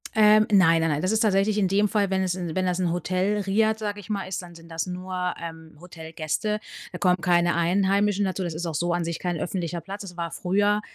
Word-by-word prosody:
Ähm, 215 0 +6
nein, 165 -5 +5
nein, 165 - +1
nein. 150 0 0
Das 185 - 0
ist 220 - +2
tatsächlich 205 -1 +2
in 200 -2 +2
dem 205 +2 +3
Fall, 205 -1 +1
wenn 190 0 +1
es 185 -1 0
in 175 -3 -4
wenn 185 +1 0
das 180 0 0
'n 180 -2 +1
Hotel, 185 +4 0
Riad, 215 +3 +1
sage 205 -1 -3
ich 200 - -15
mal, 200 -3 -2
ist, 190 - -4
dann 175 -1 -12
sind 165 0 -14
das 165 -1 -3
nur, 180 0 -3
ähm, 160 -2 -9
Hotelgäste, 165 +4 -3 0.3
da - - -6
kommen 180 -2 +3
keine 175 -1 +3
Einheimischen 195 +4 +2
dazu, 190 0 -2
das 170 -2 -3
ist 165 +3 -4
auch 165 -2 -3
so 175 +3 0
an 175 -1 -1
sich 170 -1 -3
kein 175 -2 -2
öffentlicher 170 +1 -3
Platz. 195 +5 -8
Es 180 -3 -10
war 170 -1 -3
früher, 205 +3 +1
185 Hz, 245 wpm, -25 LUFS, 170-200 Hz, 0.3 s, Ähm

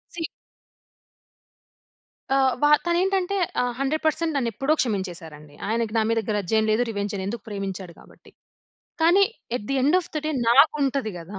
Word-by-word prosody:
See 330 - -4 2.1
ఆహ్, 265 -1 +4
వ - - +7 0.2
తను 345 0 +1
ఏంటంటే 385 0 0 0.3
ఆహ్, 245 0 0
100% 315 +3 0
నన్ను 250 -4 0
ఎప్పుడో 270 +8 +1
క్షమించేసారండి. 170 - -5
ఆయనకి 225 0 -1
నా - - +4
మీద 230 - +2
గ్రజ్ 205 -4 -2
ఏం 220 - +3
లేదు, 215 +3 +2
రివెంజ్ 205 -2 -3
లేదు, 190 - -3
ఎందుకు 225 0 -5
ప్రేమించాడు 195 -3 -5
కాబట్టి. - - -19 0.7
కానీ, 350 +5 +5 0.3
at 205 - -7
the - - +1
end 295 +7 +4
of - - -11
the 305 - -1
day - - 0 0.2
నాకు 275 +6 +6
ఉంటది 270 -4 0
కదా! 190 +4 -9
235 Hz, 165 wpm, -24 LUFS, 200-305 Hz, 2.1 s, వ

